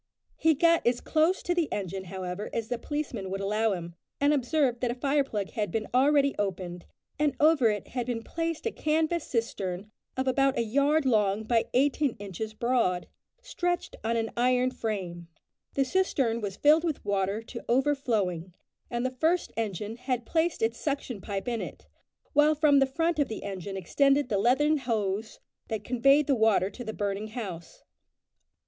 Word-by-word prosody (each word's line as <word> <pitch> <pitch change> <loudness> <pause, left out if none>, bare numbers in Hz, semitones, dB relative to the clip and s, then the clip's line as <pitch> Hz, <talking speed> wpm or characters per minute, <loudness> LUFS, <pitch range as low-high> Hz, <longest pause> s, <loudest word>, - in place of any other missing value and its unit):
He 320 -1 +3
got 335 +3 +4
as 240 0 +2
close 325 +4 +1
to 350 - +1
the 345 -4 0
engine, 190 -1 -3
however, 185 +2 -5
as 230 -1 -3
the 245 -1 -2
policemen 260 -9 -4
would 195 +1 -3
allow 210 +2 +1
him, 170 -2 -6 0.3
and 285 +1 +4
observed 265 -2 +1
that 245 - +1
a 240 - -2
fire 280 +3 +2
plug 210 -7 -4
had 210 -4 -2
been 225 -2 -2
already 280 +2 +4
opened, 180 -3 -3 0.3
and 295 -1 +2
over 295 -6 +5
it 210 -2 -3
had 245 -1 -3
been 230 -2 -2
placed 330 - -3
a 455 - 0
canvas 315 0 0
cistern 205 -4 -3 0.3
of 260 0 -1
about 270 +1 +2
a 235 - +2
yard 280 +6 +2
long 210 -4 +2
by 230 +1 +2
eighteen 280 0 +2
inches 205 +2 -6
broad, 235 -7 +1 0.4
stretched 355 -8 -2
on 230 +1 0
an 225 -1 -1
iron 250 +1 +2
frame. 185 -8 -4 0.5
The 275 - +2
cistern 265 -9 +1
was 200 -1 -4
filled 305 +3 +5
with 320 -9 -2
water 200 +2 0
to 235 +1 -8
overflowing, 225 - 0 0.3
and 240 +1 -2
the 255 - 0
first 320 +7 0
engine 215 0 -3
had 250 -1 -2
placed 325 -2 0
its 225 +1 0
suction 275 -7 -3
pipe 195 0 -4
in 235 -2 -1
it, - - -8 0.5
while 295 +1 +5
from 290 -2 +5
the 270 - +4
front 325 +4 0
of 285 - +3
the 220 - -6
engine 195 0 -5
extended 275 - +2
the 200 -4 +1
leathern 280 +8 +3
hose 220 -5 -2 0.3
that 220 -1 -3
conveyed 275 +4 +4
the 280 - +2
water 220 -5 +3
to 245 - -8
the 220 - -4
burning 205 0 -3
house. 195 -7 -7
240 Hz, 180 wpm, -28 LUFS, 205-285 Hz, 0.5 s, over